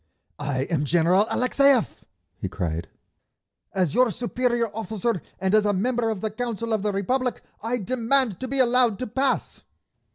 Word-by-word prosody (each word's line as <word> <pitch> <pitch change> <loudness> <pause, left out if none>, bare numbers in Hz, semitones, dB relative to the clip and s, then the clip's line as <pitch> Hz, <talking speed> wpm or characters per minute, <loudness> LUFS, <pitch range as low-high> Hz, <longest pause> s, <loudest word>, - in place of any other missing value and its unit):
"I 140 -3 -1
am 155 -1 -1
General 175 +7 +3
Alexeyev," 260 -1 +2 0.3
he - - -5
cried. 85 -1 -3 0.8
"As 180 -5 0
your 250 +2 +4
superior 240 +1 -1
officer 220 -2 -2 0.2
and 190 +1 0
as 215 -1 +5
a 205 -1 +2
member 235 +4 0
of 215 -4 -3
the 220 - -2
Council 230 0 -3
of 215 - +1
the 210 +1 0
Republic 250 +6 -1 0.2
I 230 +3 -1
demand 240 -1 +1
to 260 - -4
be 275 +2 -2
allowed 245 -4 +3
to 255 - -3
pass!" 260 +4 -1
225 Hz, 160 wpm, -25 LUFS, 190-250 Hz, 0.8 s, as